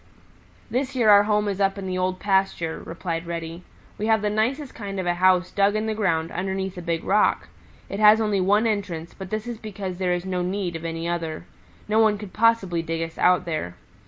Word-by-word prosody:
"This 260 Hz, +3 st, -1 dB
year 230 Hz, -4 st, +5 dB
our 205 Hz, 0 st, +7 dB
home 210 Hz, 0 st, +1 dB
is 200 Hz, -1 st, -2 dB
up 195 Hz, 0 st, +2 dB
in 195 Hz, -, -5 dB
the 185 Hz, -1 st, -2 dB
Old 185 Hz, 0 st, -1 dB
Pasture," 190 Hz, -4 st, 0 dB
replied 165 Hz, 0 st, -4 dB
Reddy. 165 Hz, 0 st, -5 dB, 0.4 s
"We 215 Hz, -, -1 dB
have 220 Hz, -1 st, +3 dB
the 210 Hz, -, +1 dB
nicest 255 Hz, +7 st, -1 dB
kind 200 Hz, -3 st, -6 dB
of 185 Hz, -, -2 dB
a 175 Hz, -, +2 dB
house 180 Hz, 0 st, +3 dB
dug 200 Hz, +1 st, +2 dB
in 215 Hz, +1 st, 0 dB
the 220 Hz, -, -1 dB
ground 165 Hz, -7 st, 0 dB
underneath 190 Hz, +1 st, -3 dB
a 180 Hz, -, -6 dB
big 170 Hz, -1 st, -2 dB
rock. -, -, +2 dB, 0.4 s
It 195 Hz, -, -5 dB
has 215 Hz, +1 st, +7 dB
only 210 Hz, -3 st, +1 dB
one 205 Hz, +4 st, +3 dB
entrance, 190 Hz, -7 st, -2 dB
but 190 Hz, -1 st, -9 dB
this 215 Hz, +2 st, -3 dB
is 240 Hz, -2 st, -6 dB
because 195 Hz, -4 st, -6 dB
there 180 Hz, -1 st, +1 dB
is 175 Hz, +1 st, -3 dB
no 185 Hz, -1 st, -2 dB
need 180 Hz, -1 st, -2 dB
of 165 Hz, 0 st, -6 dB
any 165 Hz, 0 st, -3 dB
other. 165 Hz, -1 st, -3 dB, 0.4 s
No 215 Hz, +1 st, +2 dB
one 215 Hz, -2 st, +4 dB
could 200 Hz, -2 st, -9 dB
possibly 215 Hz, -6 st, +2 dB
dig 165 Hz, 0 st, -3 dB
us 165 Hz, 0 st, -8 dB
out 180 Hz, -1 st, +4 dB
there. 155 Hz, -, -3 dB
190 Hz, 220 wpm, -24 LUFS, 175-210 Hz, 0.4 s, our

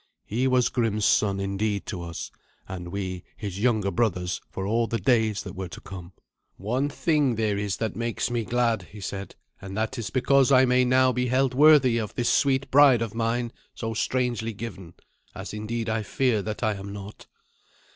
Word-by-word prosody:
He 125 Hz, +5 st, 0 dB
was 130 Hz, -2 st, +3 dB
Grim's 110 Hz, -4 st, 0 dB
son 100 Hz, -2 st, +2 dB
indeed 100 Hz, +1 st, -2 dB
to 90 Hz, -5 st, -5 dB
us, 85 Hz, -1 st, -6 dB, 0.4 s
and 90 Hz, -2 st, -6 dB
we 95 Hz, -1 st, -4 dB
his 100 Hz, -3 st, -5 dB
younger 110 Hz, -4 st, +1 dB
brothers 90 Hz, -2 st, -1 dB
for 95 Hz, -, -5 dB
all 115 Hz, +3 st, +1 dB
the 115 Hz, -, -1 dB
days 110 Hz, -4 st, +1 dB
that 95 Hz, -, -8 dB
were 95 Hz, -1 st, -5 dB
to 85 Hz, -, -10 dB
come. 90 Hz, -2 st, -10 dB, 0.4 s
"One 125 Hz, +8 st, -1 dB
thing 145 Hz, -4 st, +1 dB
there 110 Hz, -2 st, 0 dB
is 100 Hz, -1 st, -2 dB
that 110 Hz, -4 st, -3 dB
makes 115 Hz, +2 st, -2 dB
me 120 Hz, -1 st, 0 dB
glad," 115 Hz, -1 st, +1 dB
he 105 Hz, -, -9 dB
said, 100 Hz, 0 st, -6 dB, 0.3 s
"and 95 Hz, +1 st, -7 dB
that 110 Hz, +3 st, -2 dB
is 110 Hz, -4 st, -4 dB
because 135 Hz, +4 st, +3 dB
I 130 Hz, -1 st, +6 dB
may 125 Hz, 0 st, +3 dB
now 130 Hz, +1 st, +4 dB
be 125 Hz, 0 st, -1 dB
held 130 Hz, +1 st, +2 dB
worthy 135 Hz, -4 st, +6 dB
of 105 Hz, -3 st, -5 dB
this 120 Hz, -, 0 dB
sweet 135 Hz, -1 st, +1 dB
bride 135 Hz, -4 st, +6 dB
of 115 Hz, -2 st, -5 dB
mine 115 Hz, +1 st, -1 dB, 0.2 s
so 115 Hz, -1 st, -4 dB
strangely 120 Hz, -1 st, -1 dB
given, 95 Hz, -6 st, -8 dB, 0.4 s
as -, -, -7 dB
indeed 110 Hz, +2 st, -3 dB
I 110 Hz, 0 st, 0 dB
fear 115 Hz, 0 st, 0 dB
that 105 Hz, +3 st, -5 dB
I 110 Hz, -1 st, +2 dB
am 100 Hz, 0 st, -7 dB
not. 100 Hz, +1 st, -9 dB
115 Hz, 190 wpm, -26 LUFS, 100-125 Hz, 0.4 s, I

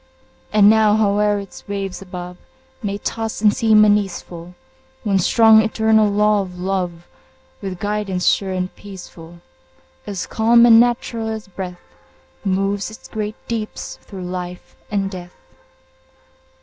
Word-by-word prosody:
And 210 Hz, -1 st, +5 dB
now, 215 Hz, -1 st, +5 dB
howe'er 210 Hz, -1 st, +2 dB
its 200 Hz, -2 st, -9 dB
waves 195 Hz, -2 st, -4 dB
above 180 Hz, -1 st, -8 dB, 0.4 s
May 200 Hz, -2 st, -3 dB
toss 225 Hz, +2 st, -4 dB
and 210 Hz, -1 st, +4 dB
seem 215 Hz, -2 st, +5 dB
uneaseful, 180 Hz, -4 st, -1 dB, 0.5 s
One 195 Hz, -2 st, +1 dB
strong, 220 Hz, +3 st, +6 dB
eternal 220 Hz, -1 st, +2 dB
law 210 Hz, 0 st, +3 dB
of 180 Hz, -2 st, -8 dB
Love, 180 Hz, -2 st, -3 dB, 0.6 s
With 190 Hz, -2 st, -5 dB
guidance 205 Hz, -2 st, -2 dB
sure 195 Hz, -1 st, +2 dB
and 185 Hz, 0 st, -3 dB
peaceful, 175 Hz, -4 st, -12 dB, 0.7 s
As 195 Hz, -3 st, -4 dB
calm 235 Hz, +2 st, +4 dB
and 230 Hz, -1 st, +8 dB
natural 235 Hz, -1 st, 0 dB
as 220 Hz, -1 st, -5 dB
breath, 180 Hz, -2 st, -7 dB, 0.6 s
Moves 195 Hz, +1 st, -1 dB
its 220 Hz, -, -13 dB
great 215 Hz, 0 st, -4 dB
deeps 225 Hz, -2 st, -5 dB
through 190 Hz, -3 st, -9 dB
life 180 Hz, 0 st, -7 dB
and 195 Hz, -2 st, -1 dB
death. 180 Hz, -2 st, -9 dB
200 Hz, 130 wpm, -20 LUFS, 185-215 Hz, 0.7 s, and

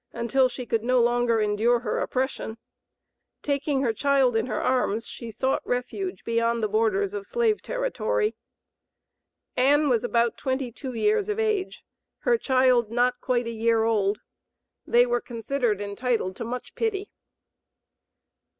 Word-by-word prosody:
until 255 Hz, +3 st, +2 dB
she 250 Hz, 0 st, -7 dB
could 225 Hz, -1 st, -1 dB
no 250 Hz, +1 st, +3 dB
longer 240 Hz, -1 st, +2 dB
endure 215 Hz, +3 st, +2 dB
her -, -, -2 dB
oppression. 255 Hz, -3 st, -2 dB, 0.9 s
Taking 280 Hz, -1 st, 0 dB
her 235 Hz, -4 st, +1 dB
child 270 Hz, -1 st, +2 dB
in 225 Hz, +2 st, +1 dB
her -, -, -2 dB
arms, 230 Hz, -3 st, 0 dB
she 235 Hz, -, -8 dB
sought 260 Hz, +4 st, -1 dB
refuge 305 Hz, +10 st, -3 dB
beyond 230 Hz, 0 st, 0 dB
the -, -, +3 dB
borders 205 Hz, -2 st, +1 dB
of 200 Hz, -1 st, -5 dB
slave 455 Hz, -3 st, +1 dB
territory. -, -, -1 dB, 1.2 s
Ann 285 Hz, +3 st, +3 dB
was 240 Hz, -3 st, +2 dB
about 235 Hz, -1 st, +1 dB
twenty 260 Hz, -2 st, -2 dB
two 260 Hz, +2 st, -7 dB
years 420 Hz, -, +1 dB
of 420 Hz, -, -1 dB
age, 430 Hz, -4 st, -1 dB, 0.4 s
her 485 Hz, -, +3 dB
child 255 Hz, -, +3 dB
not 245 Hz, +2 st, +1 dB
quite 245 Hz, -2 st, 0 dB
a 230 Hz, -, -3 dB
year 225 Hz, 0 st, +2 dB
old. 210 Hz, -2 st, +1 dB, 0.7 s
They 240 Hz, +1 st, +5 dB
were 240 Hz, 0 st, 0 dB
considered 235 Hz, -2 st, -2 dB
entitled 205 Hz, -1 st, -2 dB
to -, -, -4 dB
much 245 Hz, +2 st, -6 dB
pity. 410 Hz, -3 st, -2 dB
245 Hz, 145 wpm, -25 LUFS, 230-275 Hz, 1.2 s, They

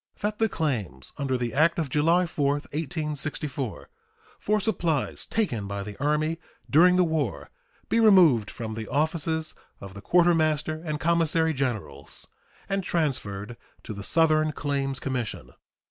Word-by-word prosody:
That 210 Hz, 0 st, -2 dB
the 225 Hz, -1 st, +3 dB
claims 105 Hz, -, -3 dB
under 135 Hz, -2 st, 0 dB
the 120 Hz, -1 st, -3 dB
act 155 Hz, +4 st, +3 dB
of 160 Hz, -3 st, 0 dB
July 165 Hz, +5 st, +3 dB
4, 145 Hz, -4 st, 0 dB
1864, 150 Hz, -4 st, -4 dB, 0.5 s
for 210 Hz, +1 st, +1 dB
supplies 170 Hz, -8 st, -1 dB
taken 125 Hz, -, -1 dB
by 100 Hz, 0 st, -4 dB
the 105 Hz, 0 st, -8 dB
Army 155 Hz, +2 st, +1 dB, 0.3 s
during 180 Hz, +5 st, +6 dB
the 180 Hz, -, +5 dB
war 160 Hz, -3 st, -2 dB, 0.4 s
be 230 Hz, -, +2 dB
removed 175 Hz, -, +6 dB
from 110 Hz, -2 st, -6 dB
the 110 Hz, 0 st, -5 dB
offices 160 Hz, +2 st, -1 dB, 0.3 s
of 95 Hz, -1 st, -9 dB
the 100 Hz, -, -9 dB
Quartermaster 155 Hz, -, +2 dB
and 155 Hz, -3 st, -3 dB
Commissary 165 Hz, -1 st, +2 dB
Generals 110 Hz, -, -4 dB, 0.4 s
and 195 Hz, 0 st, -1 dB
transferred 120 Hz, -, -2 dB, 0.3 s
to 110 Hz, -, -6 dB
the 100 Hz, -, -7 dB
Southern 155 Hz, +4 st, +2 dB
Claims 140 Hz, -2 st, -2 dB
Commission. 130 Hz, -4 st, -4 dB
150 Hz, 140 wpm, -26 LUFS, 125-165 Hz, 0.5 s, during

